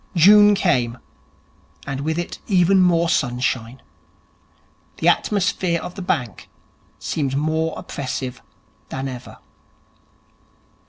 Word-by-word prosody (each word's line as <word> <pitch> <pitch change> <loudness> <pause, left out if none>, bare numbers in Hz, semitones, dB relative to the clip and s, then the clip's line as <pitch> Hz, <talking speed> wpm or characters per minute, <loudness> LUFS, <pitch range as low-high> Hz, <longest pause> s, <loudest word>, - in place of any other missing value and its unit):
June 205 +4 +7
came, 125 -11 +1 0.9
and 135 0 -4
with 160 +2 -2
it 175 - -4
more 180 -2 +4
sunshine. 125 -4 -1 1.1
The - - -1
atmosphere 185 -4 +1
of 180 +2 -7
the 195 - -8
bank 125 - -3 0.5
seemed 140 -3 -2
more 160 +2 -1
oppressive 130 -2 -5 0.5
than 135 +1 -4
ever. 125 -2 -9
160 Hz, 95 wpm, -21 LUFS, 130-180 Hz, 1.1 s, June